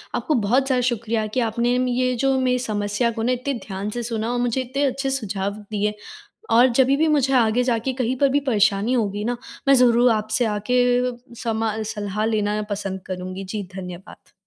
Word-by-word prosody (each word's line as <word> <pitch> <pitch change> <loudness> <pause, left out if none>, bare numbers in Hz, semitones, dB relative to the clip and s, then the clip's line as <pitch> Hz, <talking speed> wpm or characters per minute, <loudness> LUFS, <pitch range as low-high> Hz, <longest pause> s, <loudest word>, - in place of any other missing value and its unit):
आपको 310 - 0
बहुत 255 +6 +3
ज़्यादा 255 -2 +2
शुक्रिया 230 -2 -1
कि - - +2
आपने 235 +1 +1
म 255 - +1
ये 255 0 +1
जो 270 +2 +1
मेरी 250 -1 +1
समस्या 210 0 -1
को 225 -1 -4
ना, 245 - +1
इतने 255 +3 -1
ध्यान 195 +1 -4
से 240 +3 -4
सुना 230 0 -2
और 245 - -1
मुझे 245 +1 0
इतने 260 +3 -2
अच्छे 275 0 -1
सुझाव 200 -7 -2 0.2
दिए 210 0 0 0.6
और 240 +3 +6
जभी 265 +2 +3
भी 315 +2 +2
मुझे 280 -3 +2
आगे 235 -1 +3
जाके 245 +1 0
कहीं 255 0 -1
पर 280 - +4
भी 280 +2 +2
परेशानी 210 +1 +2
होगी 210 -4 -1
ना, 240 +2 -1 0.3
मैं 275 - +7
ज़रूर 245 -1 +5
आपसे 220 +2 0
आके 220 +4 +1 0.6
समा 225 -2 -1
सलाह 210 -1 -3
लेना 210 -2 0
मैं 210 0 -2
पसंद 195 -2 -3
करूँगी। 185 +1 -5
जी, 205 +2 -4
धन्यवाद। 180 +1 -10
230 Hz, 195 wpm, -22 LUFS, 210-255 Hz, 0.6 s, मैं